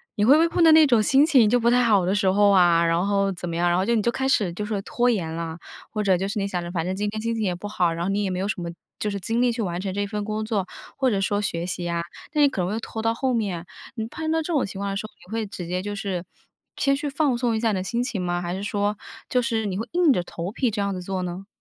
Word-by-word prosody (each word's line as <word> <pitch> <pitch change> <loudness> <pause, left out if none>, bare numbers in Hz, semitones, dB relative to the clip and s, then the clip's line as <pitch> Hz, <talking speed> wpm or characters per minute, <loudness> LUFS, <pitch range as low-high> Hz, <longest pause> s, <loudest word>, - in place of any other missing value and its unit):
你 205 - +1
会 260 - +7
不 - - +4
会 330 - +4
碰 335 +1 +1
到 325 - +8
那 315 0 +8
种 240 -5 +4
心 270 +7 +5
情 260 -9 +5
就 245 - +3
不 235 - 0
太 250 0 +4
好 205 -6 +3
的 185 - +1
时 205 -1 +1
候 205 +1 +4
啊， 175 -3 +5
然 170 +3 +1
后 200 -1 +1
怎 175 -1 -6
么 165 - -4
样， 175 +1 +1
然 175 - +2
后 185 - +2
就 235 +2 +2
你 220 - +2
开 255 +4 0
始 200 -9 +2
就 210 - -4
说 210 -1 -2
拖 245 +4 +1
延 180 -9 -1
了， 165 0 -4 0.3
或 215 - -2
者 195 -2 +4
就 190 +2 -2
是 200 - -4
你 200 - -1
想 180 -3 -2
着 175 0 -6
反 165 -2 -2
正 185 +1 -2
今 205 +1 -1
天 215 +1 -4
心 230 +1 -1
情 225 -1 -2
也 185 -3 0
不 185 +4 -7
好， 180 -4 +1
然 170 +1 -3
后 - - -1
你 200 +1 0
也 195 - -1
没 185 - -2
有 195 - -1
什 205 -3 -3
么 170 - -4 0.3
就 210 - -1
是 200 -1 -3
精 225 +5 0
力 250 -1 +3
去 230 0 -3
完 175 -2 -3
成 190 0 -3
这 205 +1 -1
份 210 0 -4
工 215 +1 -3
作， 205 -4 -1 0.3
或 265 -2 +2
者 205 -4 0
说 205 +1 0
学 170 -4 -2
习 175 -1 -3
啊， 170 0 -1 0.3
那 300 - +2
也 290 - +7
可 195 - -3
能 180 - -1
会 220 - -2
拖 225 -1 -6
到 225 0 +1
后 260 +2 0
面。 195 -7 -2 0.3
你 220 -2 -3
碰 315 +6 -4
到 325 - +2
这 335 +2 -3
种 285 - +2
情 195 0 -8
况 200 0 -2
的 195 - -2
时 215 - -4
候， - - -24 0.2
你 - - -15
会 225 -1 -2
直 180 -2 -7
接 180 +1 -2
就 205 +1 -4
是 195 -3 -3 0.5
先 275 0 +2
去 290 +1 -3
放 275 -2 +1
松 240 -2 +1
一 - - -1
下 225 0 +1
你 - - 0
的 185 - -2
心 235 +5 -1
情 240 -6 -3
吗？ 175 0 -1
还 175 0 -3
是 190 - -4
说， 205 0 -1 0.3
就 250 - +2
是 225 -2 -1
你 190 -2 -2
会 225 - -4
硬 345 -5 +4
着 180 - 0
头 175 +1 -5
皮 250 +3 0
这 205 -1 -2
样 200 0 -1
子 185 - -5
做 185 0 -3
呢？ 180 +2 -6
205 Hz, 355 characters per minute, -24 LUFS, 185-235 Hz, 0.5 s, 到